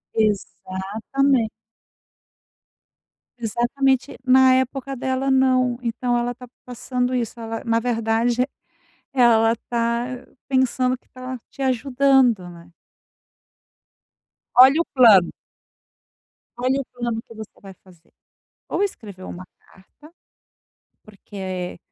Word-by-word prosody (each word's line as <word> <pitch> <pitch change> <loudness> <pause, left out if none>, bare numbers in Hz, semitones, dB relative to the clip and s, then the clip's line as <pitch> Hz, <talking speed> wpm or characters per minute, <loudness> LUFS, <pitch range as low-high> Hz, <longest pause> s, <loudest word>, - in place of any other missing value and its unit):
Exatamente. 220 +4 0 1.9
Exatamente. 255 +4 0
Na 260 0 +6
época 265 +1 -2
dela 265 +1 -1
não, 255 -2 +2
então 240 +1 -1
ela 240 0 -2
tá 250 - -11 0.2
passando 250 +1 -2
isso, 235 -1 -3
ela 225 0 -5
na 230 0 +2
verdade 235 +1 0 0.7
ela 230 -3 +4
tá 235 0 0 0.4
pensando 255 -1 +1
que - - -37
tá 255 0 -7
te 275 - -8
ajudando, 255 -5 +2
né? 170 0 -14 1.9
Olha 265 +6 +7
o - - -3
plano. 220 -9 +6 1.3
Olha 260 +3 0
o - - -9
plano 240 -2 -3
que 230 - -15
você 220 -1 -11
vai 195 -1 -11
fazer. 175 -3 -22 0.6
Ou 405 - 0
escrever 205 - -6
uma 185 0 -8
carta, 295 - -20 0.9
porque 190 -4 -7
240 Hz, 100 wpm, -22 LUFS, 220-260 Hz, 1.9 s, Olha